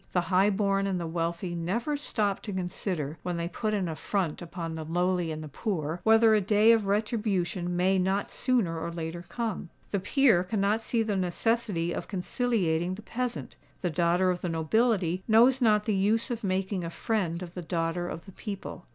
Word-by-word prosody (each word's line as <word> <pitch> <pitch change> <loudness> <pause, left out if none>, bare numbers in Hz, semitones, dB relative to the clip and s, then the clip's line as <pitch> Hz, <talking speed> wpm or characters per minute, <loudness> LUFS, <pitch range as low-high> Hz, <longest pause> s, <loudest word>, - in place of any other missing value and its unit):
The 180 - +3
high 190 +3 +5
born 195 -1 +1
and 190 -2 -1
the 170 - -3
wealthy 170 +2 -2
never 200 - -1
stop 215 -8 -1
to 210 - -6
consider, 175 -4 -3
when 175 -1 -3
they 170 0 -2
put 215 +4 -2
an 190 -3 -1
affront 165 +1 -2
upon 170 -1 -5
the 160 0 -5
lowly 175 +1 0
and 155 0 -5
the - - -7
poor, 160 - -3
whether 225 0 +6
a 215 - +4
day 210 +3 +5
of 225 -3 +3
retribution 200 -4 0
may 190 +1 +3
not 190 +2 0
sooner 230 -10 0
or 170 +1 -4
later 165 +1 -5
come. 225 -7 -3 0.2
The 200 - +1
peer 220 -2 +3
cannot 205 +3 0
see 225 0 +1
the 215 -2 -1
necessity 185 -1 0
of - - -5
conciliating 185 -4 0
the 215 - -11
peasant: 245 +1 -4 0.3
the 175 - 0
daughter 175 +3 +2
of 180 - -3
the 180 - -2
nobility 180 +2 +1
knows 240 +4 +5
not 210 -3 +4
the 215 - +1
use 215 +6 +1
of 235 -2 -4
making 190 -1 -1
a 165 - -3
friend 180 -2 -1
of 175 -1 -9
the 180 - -5
daughter 165 +1 -2
of 165 - -7
the 195 - -11
people. 195 -3 -7
185 Hz, 195 wpm, -28 LUFS, 170-215 Hz, 0.3 s, whether